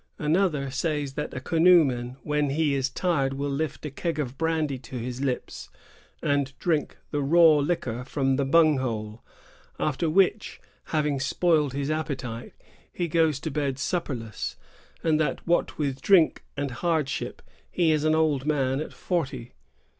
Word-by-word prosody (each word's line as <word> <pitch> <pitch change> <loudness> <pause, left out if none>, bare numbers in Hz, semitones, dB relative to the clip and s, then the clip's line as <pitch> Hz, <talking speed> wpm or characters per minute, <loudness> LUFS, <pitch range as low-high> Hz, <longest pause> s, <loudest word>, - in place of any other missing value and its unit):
* - - -46
Another 150 -3 +1
says 145 0 -2
that 150 +2 -4
a - - -2
canoe 170 +3 +5
man 125 -1 -4
when 150 -1 0
he 150 +1 +1
is 135 -1 0
tired 140 -3 0
will 140 +1 -2
lift 155 +2 -3
a 150 - -4
keg 165 +2 -3
of 135 -4 -3
brandy 160 -3 -1
to 130 0 -8
his 125 +2 -5
lips 130 -3 -3 0.5
and 140 -1 0
drink 160 -4 -1
the 145 - 0
raw 160 +2 +6
liquor 140 -6 -1
from 135 0 0
the 140 - +1
bung 155 0 +4
hole, 110 -3 -4 0.6
after 155 +2 0
which, 195 +5 +2 0.3
having 150 -3 0
spoiled 150 +1 +1
his 140 +2 -2
appe 155 -3 -2
tite, 120 -2 -7 0.4
he 175 - -2
goes 160 -3 +2
to 160 - -3
bed 140 -2 -1
supperless; 130 - -3 0.5
and 155 -2 +2
that, 155 - -1
what 175 - +1
with 135 -3 -2
drink 180 -3 +4
and 140 -1 -2
hardship, 160 -6 -1 0.3
he 170 -3 +2
is 155 -1 +1
an 155 0 +3
old 155 -4 +2
man 135 -3 +1
at - - -6
forty. 135 -9 -3
145 Hz, 165 wpm, -26 LUFS, 135-160 Hz, 0.6 s, raw